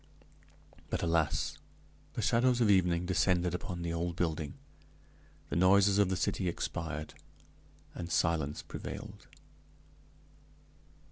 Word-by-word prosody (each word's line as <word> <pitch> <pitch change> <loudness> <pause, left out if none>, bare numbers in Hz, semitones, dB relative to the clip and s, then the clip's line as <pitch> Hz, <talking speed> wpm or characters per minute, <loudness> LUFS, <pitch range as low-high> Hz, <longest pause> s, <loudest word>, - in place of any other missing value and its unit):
But, - - -2
alas! 80 -2 0 0.6
the - - -2
shadows 125 +1 +3
of 110 -4 +4
evening 90 -2 +3
descended 90 -1 +2
upon 90 0 -4
the 85 -1 -2
old 85 0 -2
building, 80 -4 -2 0.9
the - - -3
noises 100 +3 +5
of 100 -2 +4
the 95 - 0
city 90 +1 -1
expired, 80 -2 -4 0.8
and 85 -1 -6
silence 75 -3 0
prevailed. - - -8
85 Hz, 110 wpm, -32 LUFS, 85-95 Hz, 0.9 s, noises